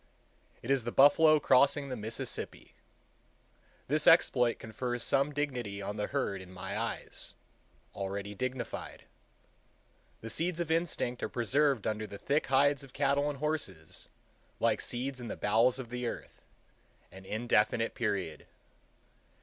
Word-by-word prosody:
It 125 Hz, -, -2 dB
is 135 Hz, -3 st, +3 dB
the 120 Hz, -, -3 dB
buffalo 155 Hz, +3 st, +6 dB
crossing 140 Hz, +1 st, +4 dB
the 130 Hz, -, -3 dB
Mississippi. 110 Hz, 0 st, -4 dB, 1.1 s
This 150 Hz, +2 st, +1 dB
exploit 125 Hz, -8 st, +5 dB
confers 120 Hz, +2 st, -4 dB
some 140 Hz, +2 st, +2 dB
dignity 125 Hz, -9 st, -3 dB
on 100 Hz, +1 st, -4 dB
the 105 Hz, -1 st, -2 dB
herd 130 Hz, -9 st, -2 dB
in 90 Hz, -1 st, -12 dB
my 90 Hz, 0 st, -6 dB
eyes—already 100 Hz, +1 st, -6 dB
dignified. 130 Hz, +4 st, -5 dB, 1.2 s
The 115 Hz, -, -4 dB
seeds 170 Hz, +4 st, 0 dB
of 170 Hz, -2 st, -2 dB
instinct 160 Hz, -7 st, -1 dB
are -, -, -2 dB
preserved 130 Hz, 0 st, +1 dB
under 110 Hz, 0 st, -2 dB
the 100 Hz, -, -8 dB
thick 145 Hz, +8 st, 0 dB
hides 140 Hz, +1 st, +3 dB
of 135 Hz, -2 st, -13 dB
cattle 140 Hz, +1 st, +2 dB
and 145 Hz, -, -4 dB
horses, 135 Hz, -, -3 dB, 0.5 s
like -, -, +2 dB
seeds 130 Hz, +1 st, -3 dB
in 120 Hz, -, -6 dB
the -, -, -5 dB
bowels 115 Hz, +5 st, +3 dB
of 130 Hz, -3 st, -7 dB
the 125 Hz, 0 st, -3 dB
earth, -, -, -7 dB, 0.7 s
an 95 Hz, 0 st, -12 dB
indefinite 110 Hz, +2 st, +1 dB
period. 100 Hz, -9 st, -2 dB
125 Hz, 135 wpm, -31 LUFS, 105-140 Hz, 1.2 s, buffalo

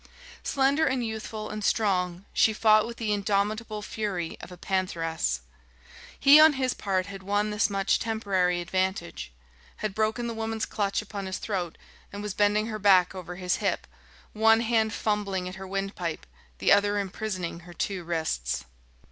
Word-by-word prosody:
Slender 280 Hz, +3 st, +2 dB
and 260 Hz, -2 st, 0 dB
youthful 220 Hz, -1 st, -5 dB
and 215 Hz, 0 st, -5 dB
strong, 185 Hz, -4 st, +1 dB
she 220 Hz, -, +4 dB
fought 215 Hz, 0 st, +4 dB
with 235 Hz, 0 st, -8 dB
the 215 Hz, -3 st, -1 dB
indomitable 210 Hz, +2 st, -1 dB
fury 200 Hz, -7 st, -3 dB
of -, -, -10 dB
a 180 Hz, -, -10 dB
pantheress. 165 Hz, -, -1 dB, 0.8 s
He 285 Hz, +2 st, +8 dB
on 310 Hz, 0 st, +8 dB
his 260 Hz, -2 st, 0 dB
part 190 Hz, -2 st, -1 dB
had 195 Hz, 0 st, -8 dB
won 205 Hz, +2 st, 0 dB
this 210 Hz, +1 st, +2 dB
much 195 Hz, -1 st, +1 dB
temporary 190 Hz, -6 st, 0 dB
advantage 185 Hz, -, -2 dB, 0.4 s
had 215 Hz, -2 st, -3 dB
broken 220 Hz, +3 st, 0 dB
the 235 Hz, -, -3 dB
woman's 225 Hz, 0 st, -2 dB
clutch 200 Hz, 0 st, -1 dB
upon 200 Hz, -2 st, -6 dB
his 190 Hz, -, -3 dB
throat 180 Hz, -6 st, -3 dB, 0.3 s
and 205 Hz, +1 st, -6 dB
was 210 Hz, -2 st, -3 dB
bending 210 Hz, +1 st, +2 dB
her 215 Hz, -1 st, -4 dB
back 190 Hz, -3 st, +5 dB
over 180 Hz, -2 st, -7 dB
his 180 Hz, 0 st, -1 dB
hip, -, -, -1 dB, 0.5 s
one 225 Hz, +1 st, +5 dB
hand 225 Hz, -2 st, +2 dB
fumbling 200 Hz, -4 st, -1 dB
at 185 Hz, -, -6 dB
her 190 Hz, 0 st, -8 dB
windpipe, 195 Hz, -4 st, -3 dB, 0.3 s
the -, -, +2 dB
other 205 Hz, +1 st, +4 dB
imprisoning 190 Hz, -3 st, -3 dB
her 175 Hz, +1 st, -13 dB
two 190 Hz, +1 st, -2 dB
wrists. 160 Hz, -, -2 dB
200 Hz, 165 wpm, -27 LUFS, 185-220 Hz, 0.8 s, He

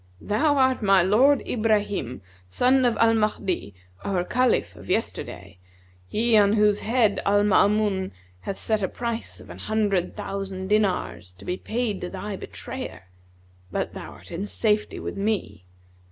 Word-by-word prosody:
Thou 285 Hz, +8 st, +1 dB
art 260 Hz, -1 st, +3 dB
my 195 Hz, -3 st, +5 dB
lord 250 Hz, +9 st, +4 dB
Ibrahim, 205 Hz, -, 0 dB, 0.2 s
son 255 Hz, -, +3 dB
of 240 Hz, -, +2 dB
Al 230 Hz, 0 st, +5 dB
Mahdi, 200 Hz, -, -1 dB, 0.3 s
our 190 Hz, -3 st, 0 dB
Caliph 235 Hz, -, +1 dB
of 100 Hz, -1 st, -13 dB
yesterday, 90 Hz, -, -3 dB, 0.5 s
he 225 Hz, -, +2 dB
on 205 Hz, -1 st, +5 dB
whose 210 Hz, -1 st, +3 dB
head 225 Hz, -2 st, +2 dB
Al 205 Hz, +1 st, +3 dB
Maamun 205 Hz, -1 st, +3 dB, 0.3 s
hath 195 Hz, -, -5 dB
set 220 Hz, -1 st, 0 dB
a 190 Hz, -, +1 dB
price 235 Hz, +3 st, -4 dB
of -, -, -12 dB
an -, -, -10 dB
hundred 205 Hz, -5 st, 0 dB
thousand 195 Hz, -1 st, -4 dB
dinars 95 Hz, -, 0 dB
to 95 Hz, +2 st, -15 dB
be 180 Hz, -, -1 dB
paid 220 Hz, 0 st, -2 dB
to 180 Hz, -, -4 dB
thy 195 Hz, +1 st, -5 dB
betrayer: 90 Hz, -, -8 dB, 0.6 s
but -, -, -2 dB
thou -, -, -8 dB
art -, -, -14 dB
in 185 Hz, +4 st, -4 dB
safety 210 Hz, 0 st, 0 dB
with -, -, -5 dB
me.' 200 Hz, -, -2 dB
205 Hz, 155 wpm, -25 LUFS, 185-220 Hz, 0.6 s, my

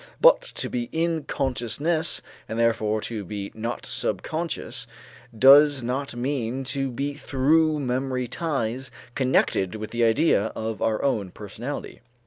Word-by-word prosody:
But -, -, +7 dB
to -, -, -2 dB
be 120 Hz, -1 st, -3 dB
in 165 Hz, -1 st, 0 dB
consciousness, 140 Hz, +6 st, -1 dB, 0.3 s
and 110 Hz, -, -3 dB
therefore 110 Hz, -2 st, +1 dB
to 110 Hz, -2 st, -4 dB
be 100 Hz, +1 st, -5 dB
not 115 Hz, +2 st, -4 dB
subconscious, 140 Hz, -7 st, -3 dB, 0.5 s
does 140 Hz, +1 st, +7 dB
not 130 Hz, +2 st, -2 dB
mean 130 Hz, 0 st, -2 dB
to 135 Hz, -1 st, -1 dB
be 140 Hz, +4 st, -3 dB
through 150 Hz, +3 st, +2 dB
memory 130 Hz, 0 st, -1 dB
ties 130 Hz, -3 st, -2 dB, 0.2 s
connected 125 Hz, -8 st, +1 dB
with 110 Hz, 0 st, -6 dB
the 120 Hz, 0 st, 0 dB
idea 115 Hz, -1 st, +3 dB
of 110 Hz, 0 st, -4 dB
our 110 Hz, -1 st, +1 dB
own 105 Hz, -9 st, 0 dB
personality. 110 Hz, +9 st, -7 dB
125 Hz, 130 wpm, -25 LUFS, 115-145 Hz, 0.5 s, But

